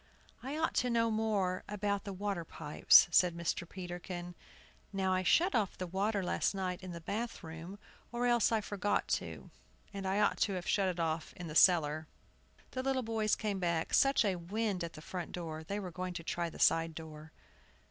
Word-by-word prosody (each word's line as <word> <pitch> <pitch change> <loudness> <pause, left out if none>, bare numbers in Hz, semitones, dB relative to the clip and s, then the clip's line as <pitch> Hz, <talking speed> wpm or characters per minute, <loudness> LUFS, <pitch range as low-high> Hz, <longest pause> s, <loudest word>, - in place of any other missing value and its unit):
"I 275 +4 -4
ought 320 - 0
to 250 - +2
know 230 -1 +2
more 210 -4 0
about 205 -1 -1
the 200 - -4
water 195 -2 -3
pipes," 150 -2 +5
said 175 0 +4
Mr. 170 0 -2
Peterkin. 175 -1 -6 0.6
"Now, 190 -1 0
I 185 - +2
shut 350 - +3
off 210 -4 0
the 185 - -3
water 195 +3 -1
last 180 - 0
night 185 -2 -3
in 185 -1 -7
the 170 - -6
bath 225 +8 -4
room, 165 +4 -8 0.3
or 240 0 -1
else 240 -2 +3
I 225 -1 +2
forgot 205 0 -1
to; - - -9 0.4
and 195 -1 -4
I 195 +2 +1
ought 210 - +2
to 200 - +2
have 185 +1 -4
shut 195 -2 +2
it 180 -1 -4
off 160 -1 -2
in 180 - -6
the 155 - -6
cellar." 155 -3 +4 0.6
The 255 - -3
little 265 -1 0
boys 220 -2 +1
came 205 -3 -2
back. 170 -2 -1
Such 275 -4 +4
a 190 -3 +1
wind 195 +1 -2
at 170 - -5
the 155 - -11
front 180 -1 -6
door, 160 -3 -5
they 200 +6 -3
were 185 -3 -6
going 180 0 -5
to 170 - -5
try 170 +1 -2
the - - -11
side 165 -1 +3
door. 155 -1 -9
185 Hz, 200 wpm, -33 LUFS, 170-210 Hz, 0.6 s, pipes